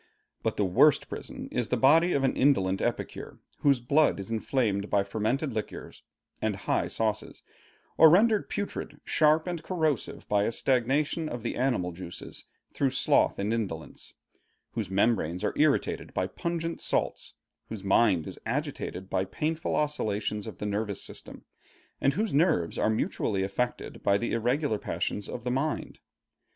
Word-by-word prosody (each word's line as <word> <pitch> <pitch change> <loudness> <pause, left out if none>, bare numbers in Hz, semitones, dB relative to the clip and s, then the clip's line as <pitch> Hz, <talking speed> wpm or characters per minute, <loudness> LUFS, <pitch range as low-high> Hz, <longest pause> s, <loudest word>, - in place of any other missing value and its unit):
But - - -1
the 105 - +2
worst 135 +11 +4
prison - - -7
is 120 -3 -1
the 125 - 0
body 160 +8 +5
of 140 - +1
an 135 - +2
indolent 95 -9 +3
epicure, - - -3 0.2
whose 140 -3 +3
blood 140 +1 +3
is 95 +3 -7
inflamed 110 -3 0
by 100 -1 +3
fermented 110 +8 -1
liquors 110 - -6 0.4
and - - 0
high - - 0
sauces, 110 -1 -2 0.6
or 160 - +10
rendered 210 +5 +4
putrid, 205 -1 -4
sharp, 155 +1 +3
and 175 -3 -3
corrosive 160 - -1
by 105 0 +2
a - - 0
stagnation 135 +6 +1
of 120 -2 -5
the 120 - -2
animal 120 -9 0
juices 85 0 -7 0.3
through 135 - +1
sloth 135 - +2
and 105 +3 -1
indolence; 85 -10 -4 0.6
whose 110 -5 -3
membranes 95 -4 +1
are - - 0
irritated 150 -2 +1
by - - +1
pungent 170 -1 -3
salts; - - -1 0.3
whose 110 -3 -6
mind 95 -4 +3
is - - -8
agitated 95 +1 -3
by 95 -1 0
painful 155 - -2
oscillations 105 -8 -1
of - - -7
the - - -5
nervous 105 -1 -2
system, - - -8 0.6
and 135 - +3
whose 215 +2 -1
nerves 140 - +2
are - - +1
mutually 105 -2 0
affected 120 +6 -3
by 100 - +3
the 120 - -2
irregular 120 0 +1
passions 105 0 -3
of - - -6
his 125 0 -1
mind. 145 +4 -2
120 Hz, 155 wpm, -28 LUFS, 100-150 Hz, 0.6 s, or